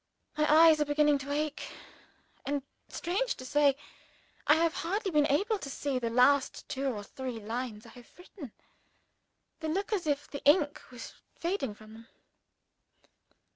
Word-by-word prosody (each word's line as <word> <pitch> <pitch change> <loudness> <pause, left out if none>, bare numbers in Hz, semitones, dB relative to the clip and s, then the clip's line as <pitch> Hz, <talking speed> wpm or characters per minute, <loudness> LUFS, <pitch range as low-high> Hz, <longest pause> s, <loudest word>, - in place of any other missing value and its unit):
My 300 0 +2
eyes 315 0 +7
are - - +3
beginning 295 0 +3
to 275 +1 -6
ache; 300 +1 -3 0.7
and, 285 -1 -2 0.3
strange 430 +9 -1
to 255 - -10
say, 285 +1 +3 0.7
I 300 - +7
have 330 0 +2
hardly 390 +4 -2
been 300 -2 +3
able 405 +9 +1
to 275 - -7
see 275 -1 -2
the 235 -2 -2
last 260 +4 +3
two 275 +1 -3
or 215 -6 -3
three 250 +2 -6
lines 225 0 -5
I - - -12
have 240 +1 -16
written. 360 - -11 1.1
They 315 - -4
look 390 +7 -2
as 365 -6 -1
if 290 -1 -1
the 285 - -8
ink 290 0 +3
was 245 -2 -9 0.2
fading 335 - -2
from 215 +1 -15
them. 225 +1 -14
290 Hz, 160 wpm, -30 LUFS, 255-320 Hz, 1.1 s, eyes